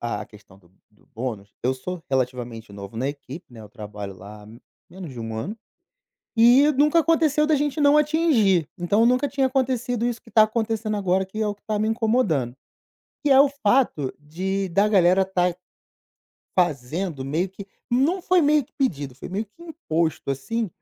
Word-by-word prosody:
à 120 - -3
questão 105 -3 -18
do 85 -3 -26 0.2
do 105 - -29
bônus, 110 -4 -5
eu 125 - +2
sou 180 +6 -6
relativamente 120 -4 -3
novo 100 +2 -9
na 130 +4 -1
equipe, 145 +3 -8
né, 115 - -11
eu 105 - -11
trabalho 105 -2 -8
lá 100 +3 -12
há - - -15 0.4
menos 175 -4 -9
de 120 - -8
1 115 -1 -5
ano 195 - -4 0.8
e 245 +6 +6
nunca 300 +4 +3
aconteceu 310 -2 +2
da 310 - +3
gente 290 +1 -1
não 290 0 +5
atingir. 285 - +2
Então, 205 +6 +2
nunca 255 +3 +2
tinha 270 0 +1
acontecido 250 -3 -1
isso 235 -1 -3
que - - -18
tá 220 +1 +6
acontecendo 220 -1 -2
agora, 190 -1 +1
que 215 +3 -7
é - - 0
o 205 - -2
que 205 - -36
tá 215 -1 -2
me 215 - 0
incomodando, 215 - 0 0.7
que 295 - +1
é 270 - +7
o 280 - +3
fato 205 - +2
de 190 +6 -3
da 200 +4 +3
galera 190 -2 +4
tá 180 -2 0 1.1
fazendo 155 -1 -1
meio 160 +7 -1
que 195 +2 -10 0.3
não 280 +10 +2
foi 365 0 +3
meio 295 -1 +3
que - - -34
pedido, 145 - -2
foi 130 - -9
meio 205 +4 -3
que 210 +12 -19
imposto, 170 - -2
assim, 215 - -3
190 Hz, 185 wpm, -23 LUFS, -, 1.1 s, é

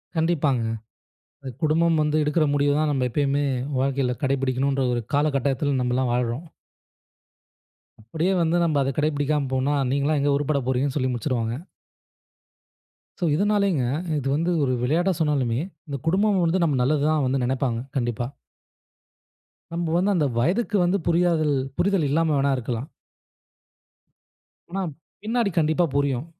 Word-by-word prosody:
கண்டிப்பாங்க. 155 -7 +1 0.8
அது 135 -2 -6
குடும்பம் 160 +1 +3
வந்து 150 0 +1
எடுக்குற 150 +2 +2
முடிவுதான் 145 +2 +2
நம்ப 130 -3 0
எப்பயுமே 145 +2 0 0.3
வாழ்க்கையில 135 -2 0
கடைப்பிடிக்கணுன்ற 135 0 0
ஒரு 120 -1 -2
கால 145 +2 +3
கட்டாயத்துல 140 +1 0
நம்பலாம் 125 0 0
வாழ்றோம். 125 +5 -1 1.6
அப்படியே 160 - -1
வந்து 165 +1 +2
நம்ப 160 -3 +1
அத 135 - 0
கடைபிடிக்காம 150 -1 0
போனா, 130 +2 +1 0.2
நீங்கலாம் 140 +2 +1
எங்க 145 +1 +2
உருப்பட 145 0 0
போறீங்கன்னு 130 +1 0
சொல்லி 130 -2 0
முடிச்சிருவாங்க. 120 -2 -2 1.6
சோ. - - -4
இதுனாலேங்க 200 -5 +1 0.4
இது 135 - -4
வந்து 165 +4 0
ஒரு 130 - +1
விளையாட்டா 170 +9 +2
சொன்னாலுமே, 135 -7 +1 0.3
இந்த 140 -2 -4
குடும்பம் 195 +2 +2
வந்து 175 +3 +1
நம்ம 150 -5 +1
நல்லது 140 +3 +1
தான் 155 -2 +1
வந்து 130 +1 0
நெனப்பாங்க. 125 -2 -1 0.2
கண்டிப்பா. 120 -1 -1 1.5
நம்ப 170 0 -2
வந்து 195 +3 +2
அந்த 155 -4 +2
வயதுக்கு 205 - +1
வந்து 180 +3 +2
புரிதல்- 165 -3 +2 0.2
புரிதல் 195 -4 +2
இல்லாம 160 +2 +2
வேணா 140 0 +2
இருக்கலாம் 120 +1 -4 1.8
ஆனா, 195 +2 -2 0.4
பின்னாடி 230 0 0
கண்டிப்பா 160 +2 +2
புரியும். 140 -2 0
145 Hz, 130 wpm, -24 LUFS, 130-165 Hz, 1.8 s, குடும்பம்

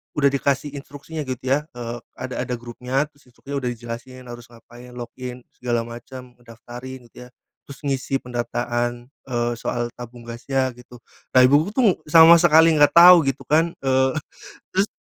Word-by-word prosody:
udah 140 -1 +3
dikasih 140 +1 -1
instruksinya, 145 +1 -8
gitu 130 -1 -5
ya, 140 +4 0
eee, 120 0 -6 0.2
ada 130 0 -6
ada 125 0 -2
grupnya, 125 +3 -3
terus 140 -3 -27
instruksinya 140 +3 -7
udah 125 - -4
dijelasin, 120 +2 -9
harus 120 0 -11
ngapain, 120 +1 -15
log 120 -1 -7
in, 125 -1 -7 0.2
segala 120 -2 -1
macam, 125 +1 -11
daftarin, 120 +2 -11
gitu 125 - -12
ya, - - -20 0.4
terus 140 +1 -12
ngisi 135 -1 -2
pendataan, 120 0 -3 0.2
eee, 120 -1 -1
soal 120 -1 -3
tabung 120 0 -10
gasnya, 130 +3 -2
gitu. 125 0 -16 0.3
Nah, 130 - +8
ibuku 145 +7 +4
tuh, 230 -8 +3
sama 165 +2 +8
sekali 165 -1 +6
nggak 145 +1 +4
tau, 175 +1 +10
gitu 135 0 -2
kan, 165 +2 +1
eee, 130 +1 +2 0.6
terus 195 +2 +2
125 Hz, 165 wpm, -22 LUFS, 120-140 Hz, 0.6 s, tau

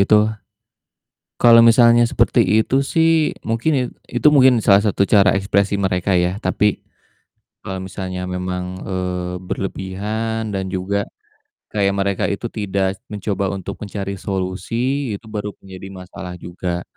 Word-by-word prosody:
itu, 100 - +4 1.3
kalo 120 -1 +8
misalnya 115 0 +6
seperti - - +3 0.2
itu 130 - -2
sih 165 0 +2 0.2
mungkin 115 +8 +1
i - - +1 0.4
itu - - +5
mungkin 130 -2 +7
salah 100 0 +6
satu 100 -1 +2
cara 100 -1 +5
ekspresi 100 +1 +1
mereka 95 0 0
ya, 90 +1 +1
tapi 105 -1 +1 0.8
kalo 95 -1 -4
misalnya 95 0 -5
memang, 90 0 -3 0.2
eee, 90 -1 -3
berlebihan, 105 +4 -3
dan 95 -1 -3
juga 100 +2 -2 0.7
kayak 100 -2 +1
mereka 100 -1 0
itu 100 +3 -4
tidak 95 -2 -2
mencoba 100 -1 -2
untuk 95 -2 -5
mencari 100 -1 -4
solusi, 110 +7 -2
itu 110 - -22
baru 105 -1 -4 0.2
menjadi 95 0 -9
masalah 90 -1 -9
juga, 85 0 -4
100 Hz, 130 wpm, -20 LUFS, 95-110 Hz, 1.3 s, kalo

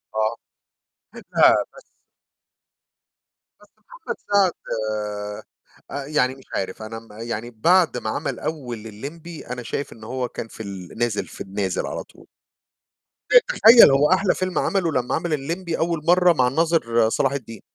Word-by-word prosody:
آه. 110 +1 0 0.8
لأ، - - +4 0.2
بس - - -14 1.8
بس - - -20
محمد - - -8
سعد 200 -3 +4 1.4
آآ 140 -1 -4
يعني 135 -4 +1
مش 135 - -17
عارف، 95 +2 -3
أنا 115 +1 -6
م 115 - -19
يعني 115 0 -4
بعد 170 +10 +3
ما - - -4
عَمل - - -3
أول 125 -8 -5
اللمْبي 155 +10 -9
أنا 125 0 -5
شايف 140 +4 -4
إن 110 - -15
هو 125 +2 -3
كان 115 - -6
في 110 - -9
ال 95 -1 -9
نازِل، 120 -3 -1
في - - -11
النازِل 95 -1 -2
على - - -5
طول. - - -20 1.2
تخيّل 230 - +8
هو 145 +4 +3
أحلى 190 +1 +3
فيلم 185 -1 -1
عَمله 185 -5 0
لمّا 125 -3 0
عَمل 165 0 -2
اللمْبي 165 +4 -3
أول 165 -2 -1
مرّة 180 0 +5
مع 130 -5 +2
الناظر 125 -7 +2
صلاح 135 +3 +1
الدين. 115 -5 -6
135 Hz, 150 wpm, -22 LUFS, 115-170 Hz, 1.8 s, تخيّل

